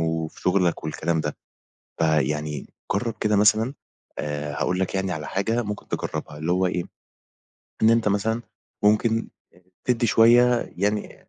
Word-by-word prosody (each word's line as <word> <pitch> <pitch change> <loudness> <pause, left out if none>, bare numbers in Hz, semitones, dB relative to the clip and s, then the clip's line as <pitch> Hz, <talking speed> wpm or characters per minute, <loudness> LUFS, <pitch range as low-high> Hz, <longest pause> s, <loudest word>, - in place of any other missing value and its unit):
وفي 80 -1 -2
شغلك 90 -3 +1
والكلام 80 +1 -1
ده، 75 -1 -3 0.6
فيعني 75 -2 0 0.3
جرّب 115 +3 -1
كده 105 -1 +2
مثلًا 110 +5 +4 0.5
آآ 75 0 -3
هاقول 90 +5 -1
لَك 95 +1 -1
يعني 95 -1 -1
على 75 -3 -4
حاجة 115 +5 0
ممكن 105 -1 -6
تجرّبها 75 - -4
اللي 80 +3 -2
هو 90 +1 +2
إيه؟ 90 -1 -1 1.0
إن 110 - +7
أنت 115 -1 +3
مثلًا 110 +3 0 0.4
ممكن 110 +2 +2 0.6
تدّي 120 -1 +2
شوية 120 +2 +5
يعني 105 +3 -2
95 Hz, 140 wpm, -24 LUFS, 80-110 Hz, 1.0 s, إن